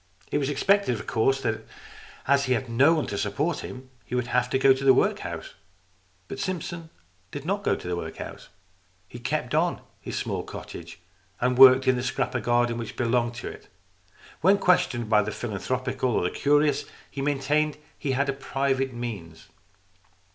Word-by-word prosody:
It 145 - +1
was 140 -1 -1
expected, 190 +1 +2
of 110 - -8
course, 135 +4 +1
that, 115 -3 -2 0.6
as 140 0 +3
he 130 - +2
had 125 +1 -1
no 135 +8 +4
one 155 - 0
to 100 - -4
support 145 +11 -1
him, 130 0 -9
he 125 - -5
would 125 -1 0
have 125 +1 +1
to 130 - +1
go 135 0 +6
to 130 +1 -5
the 135 -1 +6
workhouse. - - -1 0.7
But - - -7
Simpson 170 -2 -4 0.4
did 145 +4 -7
not 200 +3 -1
go - - +2
to - - -8
the 90 - -1
workhouse. 80 -2 -7 0.6
He - - -10
kept - - -2
on - - +1 0.2
his - - -6
small - - -2
cottage - - -9 0.4
and 125 +1 +1
worked 130 0 +8
in 130 -1 +4
the - - -1
scrap 125 +1 -2
of 125 - -1
garden 120 0 +1
which 115 -2 -6
belonged 120 -1 +1
to 120 - -6
it. - - -12 0.7
When 190 +5 +5
questioned 135 - +2
by 105 -1 +4
the 105 - -3
philanthropical 125 +4 -2
or - - +1
the 90 - 0
curious, 145 0 +2 0.3
he 140 - -5
maintained 145 +2 +1
that - - -24 0.2
he 135 - -1
had 140 +1 0
private 135 -1 -1
means. 100 -10 -7
130 Hz, 185 wpm, -26 LUFS, 120-145 Hz, 0.7 s, worked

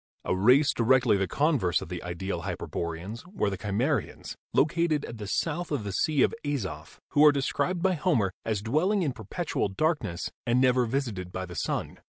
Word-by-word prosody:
A - - +1
race 125 +9 +5
directly 120 -1 +4
the 95 -1 0
con 150 - +2
verse 90 -4 +1
of - - -8
the 90 -2 -5
ideal 90 0 -4
hyperboreans 85 +7 -5
were 180 - -1
the - - -2
Cimmerians, 115 +8 -2 0.2
located 155 -1 +2
at 115 - -8
the 105 - -5
south 165 - -1
of 145 -7 -2
the 100 - -4
Sea 140 +8 +2
of - - +2
Azof, 95 - -4
who 145 - +4
are 150 - +9
described 170 +5 -1
by 190 -1 +3
Homer 145 - +1
as 105 -3 -2
dwelling 180 - +1
in 140 -5 -1
perpetual 120 - -2
darkness 105 - -1
and 120 0 +2
never 125 -1 +3
visited 110 -8 -3
by 95 0 -4
the 90 -1 -10
sun. 75 - -3
120 Hz, 185 wpm, -28 LUFS, 95-150 Hz, 0.2 s, are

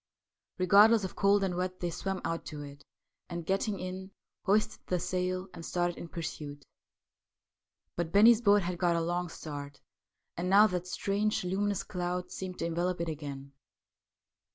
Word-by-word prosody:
Regardless 205 +4 +6
of 190 - -5
cold 200 0 +3
and 190 -2 0
wet 185 +1 -2
they 175 -1 -2
swam 190 +3 -3
out 165 0 -2
to 150 -2 -6
it, 145 0 -11 0.5
and, 170 -1 -5
getting 195 +2 0
in, 185 +1 -5 0.4
hoisted 210 +2 +2
the 180 - 0
sail 185 +1 -2
and 165 - -9
started 175 0 -1
in - - -6
pursuit. 150 -4 -6 1.3
But 170 -1 -2
Eennie's 220 +3 +7
boat 205 -3 +5
had 175 0 -3
got 175 -2 +2
a 170 - +1
long 175 +1 -1
start, 145 -3 -7 0.6
and 175 +2 -2
now 200 +3 +8
that 180 -3 -1
strange 205 +3 0
luminous 195 +2 0
cloud 180 0 -3
seemed 185 -1 -6
to - - -2
envelope 175 +2 -1
it 170 - -2
again. 140 -3 -6
180 Hz, 160 wpm, -31 LUFS, 170-195 Hz, 1.3 s, now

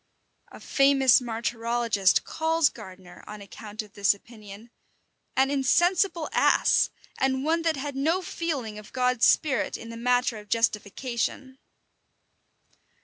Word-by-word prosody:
A - - -12
famous 275 -2 +4
martyrologist 230 -3 0
calls 325 -1 +1
Gardiner, 185 -4 -13
on 210 0 -9
account 210 +1 -8
of 210 - -18
this 200 0 +2
opinion, 215 +1 -14 0.7
"an 270 +1 +3
insensible 340 +5 +1
ass, - - +3 0.3
and 265 0 0
one 325 +3 +1
that 325 -1 0
had 285 0 -5
no 325 +7 0
feeling 270 -13 -4
of 210 - -15
God's 250 -2 +2
spirit 280 -6 +1
in 230 - -10
the 230 - -8
matter 245 -1 0
of 210 0 -15
justification." 235 +4 -2
245 Hz, 125 wpm, -26 LUFS, 215-280 Hz, 0.7 s, famous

